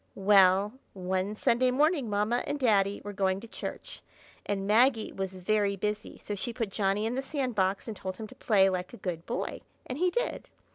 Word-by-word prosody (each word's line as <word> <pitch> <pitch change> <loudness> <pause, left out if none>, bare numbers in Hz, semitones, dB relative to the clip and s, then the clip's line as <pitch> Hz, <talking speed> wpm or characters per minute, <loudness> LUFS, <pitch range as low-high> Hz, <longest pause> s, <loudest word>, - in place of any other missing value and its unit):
Well! 195 +1 +5 0.2
one 190 +2 -2
Sunday 240 +4 +2
morning 285 -1 +2
Mamma 210 +4 +1
and 290 - -1
Daddy 205 -5 +2
were 205 - -6
going 190 -1 +1
to 230 - -10
church, - - -7 0.5
and 195 -1 -1
Maggie 225 +2 +3
was 190 -1 -4
very 200 +2 +1
busy, 210 +2 -3
so 210 - -6
she 205 +4 -3
put 225 -3 -2
Johnny 200 +1 0
in 225 - -1
the 265 - -1
sand 270 -2 -2
box, 190 0 0
and 220 - -4
told 185 -1 -5
him 220 - -6
to 215 - -12
play 210 -7 +3
like 185 +1 -2
a - - -13
good 170 -6 -5
boy, 240 - -3 0.2
and 255 +3 -5
he 365 +1 +3
did. 485 +7 -3
210 Hz, 200 wpm, -29 LUFS, 195-240 Hz, 0.5 s, Well